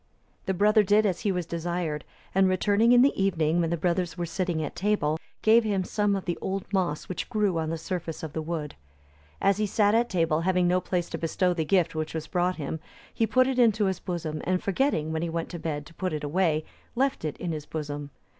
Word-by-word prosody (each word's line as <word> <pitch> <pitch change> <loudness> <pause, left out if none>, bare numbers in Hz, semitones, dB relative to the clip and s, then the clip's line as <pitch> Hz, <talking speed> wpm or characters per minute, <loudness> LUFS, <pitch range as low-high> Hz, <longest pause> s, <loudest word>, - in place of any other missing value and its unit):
The 190 - 0
brother 210 +3 +5
did 210 +2 +3
as 185 -4 0
he 205 - 0
was 180 -2 -2
desired; 170 -2 -3 0.3
and 190 0 +4
returning 205 +5 +3
in 245 0 +7
the 280 - +4
evening, 170 -3 +2
when 165 - 0
the 170 - 0
brothers 175 +2 -1
were 175 - -1
sitting 170 -1 -2
at 145 - -5
table, 180 -7 0 0.2
gave 225 +2 +6
him 200 -3 0
some 205 +2 0
of 195 - -4
the 175 - -2
old 195 0 -2
moss 175 -6 0
which 185 - -4
grew 210 -7 +1
on 160 -1 -2
the 165 - -2
surface 165 -1 -5
of 155 -2 -5
the 160 - -2
wood. 155 -2 -4 0.7
As 195 0 +3
he 210 0 0
sat 205 +1 +3
at 235 +1 +2
table, 165 -3 +1
having 180 0 +2
no 180 +1 +2
place 180 -1 -1
to - - -3
bestow 180 +2 +1
the 160 -2 -1
gift 180 -2 +2
which 155 0 -3
was 160 - -3
brought 180 0 0
him, 155 +1 -4 0.3
he 225 - +1
put 255 +4 +4
it 260 -1 0
into 220 -3 +4
his 190 -2 -1
bosom; 165 -4 -4
and 185 0 0
forgetting, 195 - 0
when 160 0 -1
he 170 - -2
went 165 0 -3
to 170 - -6
bed, 150 -2 -3
to 165 - -15
put 185 0 -3
it 150 - -3
away, 155 0 +1 0.3
left 270 -3 0
it 155 -2 -3
in 175 - -3
his 150 -2 -5
bosom. 145 -2 -5
180 Hz, 235 wpm, -27 LUFS, 160-200 Hz, 0.7 s, in